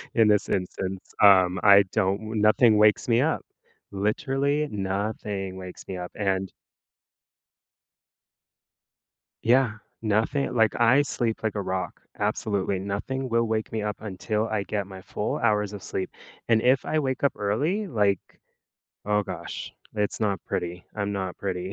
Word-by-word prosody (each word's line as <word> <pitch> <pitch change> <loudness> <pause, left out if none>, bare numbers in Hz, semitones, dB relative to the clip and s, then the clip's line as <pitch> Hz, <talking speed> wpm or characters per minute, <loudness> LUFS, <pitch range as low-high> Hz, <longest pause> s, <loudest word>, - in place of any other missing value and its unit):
in 115 -2 +5
this 105 -1 +2
instance, 95 0 -3
um, 95 -2 +6
I 100 -1 +8
don't 95 +1 +1
w 110 +1 -7
nothing 110 +1 +5
wakes 105 0 +4
me 120 +1 +4
up. 160 +2 0 0.5
Literally, 135 +9 0
nothing 100 -1 -3
wakes 90 -1 -9
me 95 - -5
up, 90 0 -6
and 95 -2 -1 2.9
Yeah, 125 -1 +3 0.3
nothing 110 +7 0
like, 110 -2 +3
I 125 +4 +5
sleep 120 -5 -2
like 110 -1 -1
a 105 - -1
rock. 95 -1 -3 0.2
Absolutely 105 -2 0
nothing 105 +7 -3
will 115 0 +2
wake 110 -1 -2
me 110 - -2
up 105 0 -3
until 105 +2 -2
I 110 -2 -1
get 100 +1 -2
my 95 -1 -10
full 105 - -3
hours 105 -3 +1
of 100 - -7
sleep, 95 - -3 0.4
and 110 -1 +4
if 130 +2 +3
I 155 - +1
wake 130 -3 -2
up 140 - +3
early, 150 - 0
like, 105 - +2 0.9
oh 105 0 +2
gosh, - - -6 0.2
it's 105 0 -1
not 100 -3 0
pretty. 90 +1 -3
I'm 100 -1 -2
not 95 -2 -3
pretty. 95 -1 -3
105 Hz, 150 wpm, -26 LUFS, 95-115 Hz, 2.9 s, I